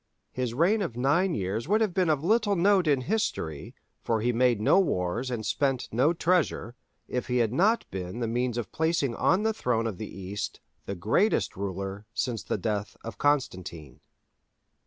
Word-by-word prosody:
His 125 Hz, -2 st, -3 dB
reign 190 Hz, -, +3 dB
of 125 Hz, -, -3 dB
nine 165 Hz, +9 st, +2 dB
years 100 Hz, +5 st, -2 dB
would 210 Hz, +4 st, +3 dB
have 215 Hz, -5 st, +1 dB
been 180 Hz, -2 st, +2 dB
of 150 Hz, -2 st, +1 dB
little 210 Hz, +2 st, +2 dB
note 190 Hz, -1 st, +3 dB
in 140 Hz, -3 st, +3 dB
history—for 115 Hz, -, -3 dB
he 120 Hz, +3 st, +1 dB
made 120 Hz, -2 st, +3 dB
no 110 Hz, -, +4 dB
wars 115 Hz, -, 0 dB
and 115 Hz, -4 st, -3 dB
spent 135 Hz, -3 st, 0 dB
no 130 Hz, +8 st, +3 dB
treasure—if 165 Hz, -8 st, -2 dB
he 125 Hz, 0 st, 0 dB
had 115 Hz, -2 st, +1 dB
not 210 Hz, -, +3 dB
been 95 Hz, +3 st, -5 dB
the 115 Hz, -, -1 dB
means 120 Hz, +1 st, -1 dB
of 115 Hz, -6 st, -4 dB
placing 160 Hz, -5 st, 0 dB
on 190 Hz, -, +2 dB
the 220 Hz, 0 st, +1 dB
throne 120 Hz, -, 0 dB
of 110 Hz, -4 st, -4 dB
the 110 Hz, -, -5 dB
East 95 Hz, +2 st, -5 dB, 0.3 s
the 100 Hz, -, -3 dB
greatest 110 Hz, -, +1 dB
ruler 100 Hz, +1 st, -5 dB
since 120 Hz, -4 st, -1 dB
the -, -, -2 dB
death 105 Hz, +1 st, -3 dB
of 115 Hz, -, -8 dB
Constantine. 90 Hz, -, -1 dB
125 Hz, 175 wpm, -27 LUFS, 105-170 Hz, 0.3 s, no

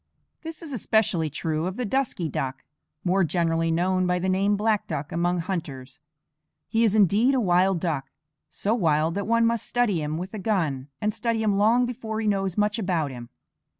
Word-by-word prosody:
This 325 Hz, +1 st, -7 dB
is 300 Hz, -4 st, -5 dB
especially 200 Hz, -8 st, +1 dB
true 155 Hz, +2 st, -2 dB
of 185 Hz, -, -5 dB
the 250 Hz, -, -2 dB
dusky 230 Hz, -7 st, -1 dB
duck, 135 Hz, -2 st, -4 dB, 0.4 s
more 190 Hz, +1 st, +2 dB
generally 165 Hz, -1 st, +1 dB
known 185 Hz, +2 st, +1 dB
by 180 Hz, 0 st, +1 dB
the 185 Hz, +1 st, -1 dB
name 200 Hz, +2 st, +2 dB
black 215 Hz, 0 st, +1 dB
duck 145 Hz, +2 st, -4 dB
among 175 Hz, +1 st, 0 dB
hunters. 140 Hz, -8 st, -5 dB, 0.7 s
He 225 Hz, 0 st, +1 dB
is 215 Hz, -2 st, +3 dB
indeed 215 Hz, +6 st, +4 dB
a -, -, +2 dB
wild 185 Hz, -3 st, +3 dB
duck, 155 Hz, -6 st, -2 dB, 0.4 s
so 210 Hz, -, -1 dB
wild 160 Hz, -6 st, +2 dB
that 200 Hz, +2 st, -3 dB
one 230 Hz, 0 st, +3 dB
must 230 Hz, -1 st, 0 dB
study 225 Hz, -9 st, +1 dB
him 150 Hz, +1 st, -3 dB
with 185 Hz, +4 st, -6 dB
a 215 Hz, -, -5 dB
gun, 165 Hz, -11 st, -1 dB
and 210 Hz, 0 st, 0 dB
study 230 Hz, -1 st, -1 dB
him 210 Hz, -2 st, +2 dB
long 225 Hz, +5 st, +4 dB
before 225 Hz, -3 st, -4 dB
he 225 Hz, -, -2 dB
knows 195 Hz, -3 st, 0 dB
much 210 Hz, +1 st, +1 dB
about 170 Hz, -8 st, -1 dB
him. 120 Hz, -2 st, -9 dB
190 Hz, 190 wpm, -25 LUFS, 165-220 Hz, 0.7 s, indeed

